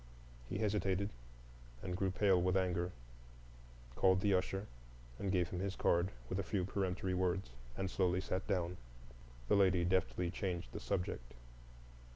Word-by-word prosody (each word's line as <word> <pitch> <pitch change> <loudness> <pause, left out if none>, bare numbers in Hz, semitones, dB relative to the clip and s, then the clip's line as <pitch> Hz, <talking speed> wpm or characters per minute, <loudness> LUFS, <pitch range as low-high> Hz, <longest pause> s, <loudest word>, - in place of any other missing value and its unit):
He - - -2
hesitated 100 -2 +1 0.7
and 90 - -2
grew 95 +1 +1
pale 95 0 +3
with 95 +1 +3
anger, 90 -1 0 1.0
called 95 +4 +4
the 100 -1 +3
usher 95 +2 0 0.5
and 100 - -1
gave 90 -3 +2
him 90 - -3
his 100 0 -2
card, 85 +2 +2 0.2
with 95 - -2
a - - 0
few 95 -1 -1
peremptory 95 -1 -1
words, 90 -5 0 0.3
and 95 - 0
slowly 90 -1 +1
sat 95 0 -2
down. 90 -2 0 0.7
The - - +4
lady 95 -3 +4
deftly 90 -1 +1
changed 90 -3 -3
the - - -5
subject. - - -3
95 Hz, 150 wpm, -37 LUFS, 90-95 Hz, 1.0 s, called